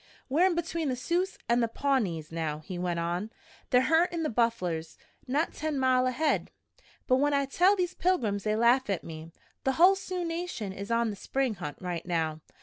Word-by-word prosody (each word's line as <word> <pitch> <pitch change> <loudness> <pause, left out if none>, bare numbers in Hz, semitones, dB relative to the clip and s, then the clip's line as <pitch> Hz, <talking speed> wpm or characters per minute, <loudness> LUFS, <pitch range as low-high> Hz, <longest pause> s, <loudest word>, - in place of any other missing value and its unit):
"We're 325 +8 +4
in 360 - 0
between 335 -2 -2
the 255 - 0
Sioux 345 +9 0 0.2
and 235 +1 +3
the 230 - +2
Pawnees 220 - -1
now," 160 -2 -2
he 175 +4 -7
went 175 -1 -1
on. 175 +5 -2 0.4
"They're 250 - +5
huntin' 330 +3 +2
the 310 - -1
bufflers 180 -9 -1 0.3
not 290 +6 0
ten 310 -2 -2
mile 255 -1 +3
ahead. 290 +4 0 0.6
But 255 - +3
when 290 +1 +2
I 280 0 +2
tell 360 +8 +4
these 365 -2 -1
pilgrims, 230 - 0
they 215 0 +1
laugh 235 +2 +3
at 195 -4 -1
me. 160 0 -9 0.3
The 265 - +1
hull 360 +7 +6
Sioux 370 -2 -4
nation 330 - -4
is 200 +2 -7
on 230 -1 +1
the - - -6
spring 265 +4 -1
hunt 175 -7 -6
right 180 -2 -4
now. 160 -3 -1
250 Hz, 195 wpm, -29 LUFS, -, 0.6 s, hull